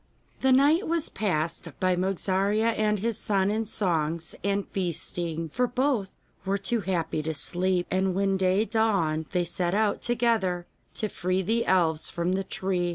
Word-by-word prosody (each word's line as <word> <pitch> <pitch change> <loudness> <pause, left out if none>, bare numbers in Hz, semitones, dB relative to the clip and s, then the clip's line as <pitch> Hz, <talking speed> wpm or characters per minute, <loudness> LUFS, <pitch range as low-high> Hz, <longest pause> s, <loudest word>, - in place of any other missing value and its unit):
The 265 - +3
night 290 +8 +4
was 335 -1 +1
passed 165 -4 -2
by 185 -1 +2
Mogarzea 195 +4 +1
and 210 -1 +1
his 225 +2 -2
son 195 -1 +1
in 220 +1 -1
songs 165 -5 -1
and 200 0 0
feasting, 170 -2 -3
for 250 +10 0
both 245 -5 0 0.3
were 195 +1 0
too 220 +4 -1
happy 170 -4 -1
to 160 +1 -3
sleep, 180 +4 0
and 190 0 +1
when 195 0 +1
day 190 +3 +2
dawned 195 -8 +1
they 180 -1 +1
set 175 +1 0
out 210 -1 +1
together 225 -7 +1 0.3
to 215 - -1
free 185 -1 -1
the 230 +5 0
elves 165 -4 +2
from 170 +1 -1
the 190 +1 0
tree. 185 -2 -1
190 Hz, 160 wpm, -27 LUFS, 175-215 Hz, 0.3 s, night